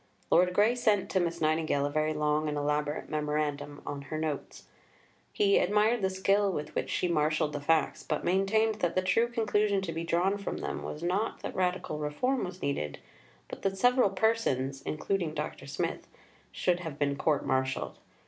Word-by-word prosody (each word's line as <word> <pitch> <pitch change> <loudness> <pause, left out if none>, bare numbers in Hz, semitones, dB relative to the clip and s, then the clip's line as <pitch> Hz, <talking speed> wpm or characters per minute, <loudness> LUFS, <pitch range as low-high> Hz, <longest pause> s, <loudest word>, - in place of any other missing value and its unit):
Lord 180 +1 +5
Grey 215 +3 +5
sent 220 -5 +1
to 190 - +2
Miss 170 -1 -1
Nightingale 155 -2 +1
a 145 - -2
very 155 +1 0
long 150 0 +1
and 150 - -2
elaborate 150 +1 -1
Memorandum 150 -1 -2
on 140 -1 -4
her 155 - -3
Notes. 155 -3 -4 0.7
He 200 -1 +3
admired 210 +4 +2
the 190 - +2
skill 195 +1 +2
with 150 -4 -4
which - - -2
she 180 - 0
marshalled 155 -2 +1
the 145 - -3
facts; 160 +2 +1
but 155 - -2
maintained 210 +4 +2
that 175 -1 0
the 185 - +2
true 225 +6 +3
conclusion 210 -3 +1
to 170 - -3
be 165 +1 -3
drawn 180 +4 +1
from 200 - -4
them - - -4
was 150 - -6
not 190 +6 -1
that - - -4
radical 180 -4 -1
reform 240 - 0
was 180 0 -8
needed, 75 - -2 0.5
but - - -8
that 195 0 -1
several 245 +1 +4
persons 185 - 0
(including 160 0 -1
Dr. 150 -2 -5
Smith) 140 - -3 0.4
should 180 -1 +1
have 160 -5 -6
been 140 -1 +1
court 150 0 +1
martialled. 130 0 -1
170 Hz, 180 wpm, -30 LUFS, 150-195 Hz, 0.7 s, Lord